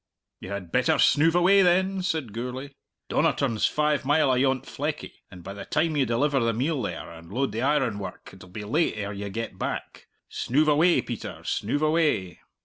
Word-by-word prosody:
"You - - -9
had 100 -4 -6
better - - +2
snoove 160 +3 +4
away 190 +3 +5
then," 190 +1 +2
said 160 - -2
Gourlay. 125 +4 -5 0.4
"Donnerton's 120 -6 +1
five 150 -1 0
mile 145 0 +3
ayont 130 0 +1
Fleckie, 150 +1 -4 0.2
and 90 -4 -12
by 100 - -7
the 100 - -8
time 155 +1 0
you 135 -4 +2
deliver 135 +5 +1
the 115 -2 +1
meal 135 +5 -1
there, 105 - -5
and 85 +1 -13
load 135 +5 -1
the 115 - -3
ironwork, 125 -8 -1
it'll 90 -1 -14
be 105 +3 -7
late 150 +11 +1
ere 100 0 -4
you 100 0 -5
get 110 -2 -5
back. - - -5 0.2
Snoove 150 +5 +1
away, 165 +4 +4
Peter; 120 -3 -7
snoove 145 +9 -1
away!" 155 - +1
130 Hz, 180 wpm, -26 LUFS, 105-155 Hz, 0.4 s, away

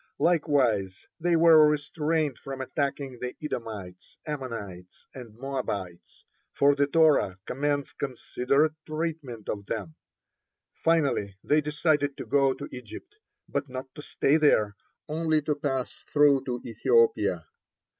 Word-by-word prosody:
Likewise 130 - +1
they 175 +1 +2
were 160 -2 +7
restrained 150 -1 -1
from 135 -1 -7
attacking 135 -1 -3
the 125 0 -5
Edomites, 105 -10 -7
Ammonites, 115 - -7
and 115 -4 -11
Moabites, 110 -10 -5 0.3
for 140 +1 +4
the 140 0 +1
Torah 150 - +3
commands 145 +1 -1
considerate 140 +3 0
treatment 155 -8 -4
of 100 -1 -4
them. 95 -8 -4 0.9
Finally 140 - +1
they 150 +1 +3
decided 150 -1 0
to - - -6
go 135 -2 +2
to - - -7
Egypt, 125 - -10 0.3
but 140 -1 -3
not 130 +1 -7
to 150 - -9
stay 145 0 +2
there, 110 -10 +3 0.3
only 155 0 +1
to 150 - +1
pass 135 -3 -2 0.2
through 145 -2 +4
to 125 -2 -3
Ethiopia. 445 - +2
140 Hz, 125 wpm, -27 LUFS, 120-150 Hz, 0.9 s, were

